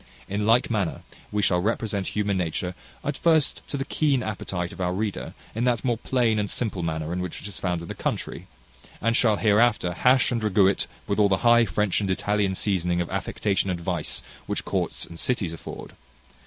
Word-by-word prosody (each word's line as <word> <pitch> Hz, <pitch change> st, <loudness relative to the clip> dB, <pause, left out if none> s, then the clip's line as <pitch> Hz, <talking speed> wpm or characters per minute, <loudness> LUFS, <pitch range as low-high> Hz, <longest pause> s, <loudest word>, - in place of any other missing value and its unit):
In 105 Hz, +2 st, -1 dB
like 115 Hz, +2 st, +4 dB
manner, 100 Hz, -6 st, -1 dB, 0.3 s
we 105 Hz, 0 st, 0 dB
shall 90 Hz, -2 st, +3 dB
represent 100 Hz, -1 st, -1 dB
human 105 Hz, -1 st, 0 dB
nature 90 Hz, 0 st, -1 dB, 0.3 s
at 145 Hz, -, -1 dB
first 160 Hz, -3 st, +3 dB
to 140 Hz, -, -3 dB
the 135 Hz, -, -2 dB
keen 145 Hz, -4 st, +1 dB
appetite 90 Hz, -4 st, -3 dB
of -, -, -8 dB
our 90 Hz, 0 st, 0 dB
reader, 105 Hz, 0 st, -3 dB, 0.2 s
in 115 Hz, -, -1 dB
that 125 Hz, 0 st, +1 dB
more 120 Hz, -3 st, +1 dB
plain 115 Hz, -4 st, +1 dB
and 105 Hz, -1 st, -1 dB
simple 105 Hz, -6 st, -1 dB
manner 80 Hz, 0 st, -2 dB
in 90 Hz, -, -2 dB
which 90 Hz, -2 st, -4 dB
it -, -, -8 dB
is 100 Hz, -, -7 dB
found 90 Hz, -2 st, -1 dB
in -, -, -8 dB
the -, -, -4 dB
country, -, -, -4 dB, 0.5 s
and 115 Hz, +1 st, +1 dB
shall 110 Hz, -4 st, +4 dB
hereafter 105 Hz, -4 st, +3 dB
hash 125 Hz, +8 st, +4 dB
and 120 Hz, -2 st, 0 dB
ragoo 100 Hz, -2 st, +4 dB
it 95 Hz, -, +2 dB, 0.2 s
with 100 Hz, -, -1 dB
all 100 Hz, -1 st, +5 dB
the 95 Hz, -, +3 dB
high 120 Hz, 0 st, +7 dB
French 105 Hz, +1 st, +1 dB
and 100 Hz, -, -1 dB
Italian 100 Hz, 0 st, +1 dB
seasoning 90 Hz, -3 st, +1 dB
of 85 Hz, -, -2 dB
affectation 100 Hz, -2 st, 0 dB
and 90 Hz, -2 st, -1 dB
vice 85 Hz, -3 st, -2 dB, 0.2 s
which -, -, -2 dB
courts -, -, -1 dB
and 85 Hz, -, -11 dB
cities 100 Hz, -10 st, 0 dB
afford. 85 Hz, -, -8 dB
100 Hz, 205 wpm, -25 LUFS, 90-115 Hz, 0.5 s, high